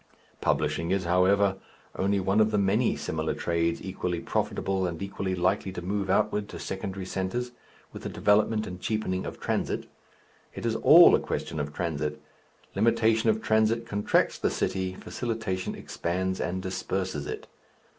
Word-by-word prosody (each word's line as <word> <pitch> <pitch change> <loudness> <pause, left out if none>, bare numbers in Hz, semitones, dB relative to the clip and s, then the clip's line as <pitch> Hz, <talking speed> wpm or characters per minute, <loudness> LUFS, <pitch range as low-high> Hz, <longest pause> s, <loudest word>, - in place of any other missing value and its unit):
Publishing 75 +2 0
is, 95 0 +1
however, 95 +3 +3 0.4
only 100 +1 +1
one 95 +3 +1
of 110 0 +5
the 105 - 0
many 100 +4 +2
similar 80 0 -2
trades 85 0 0
equally 90 -2 -3
profitable 95 +1 -1
and 85 -2 -5
equally 100 -1 -3
likely 95 +2 0
to 90 - -5
move 100 +1 -2
outward 105 +1 +1
to - - -7
secondary 95 0 -5
centres, 95 +7 -2 0.4
with - - -8
the - - -4
development 105 +1 +2
and 90 0 -8
cheapening 100 -4 -1
of - - -7
transit. - - -1 0.7
It - - -6
is - - +1
all - - +8
a - - +5
question 80 - -4
of 75 0 -3
transit. 75 -2 -2 0.5
Limitation 110 +1 +3
of 110 0 +1
transit 110 +1 +2
contracts 105 -2 +1
the - - +1
city, 95 -1 -2
facilitation 110 -6 -3
expands 95 +2 -2
and 95 +2 -2
disperses 95 -4 -3
it. - - -5
95 Hz, 155 wpm, -27 LUFS, 90-105 Hz, 0.7 s, all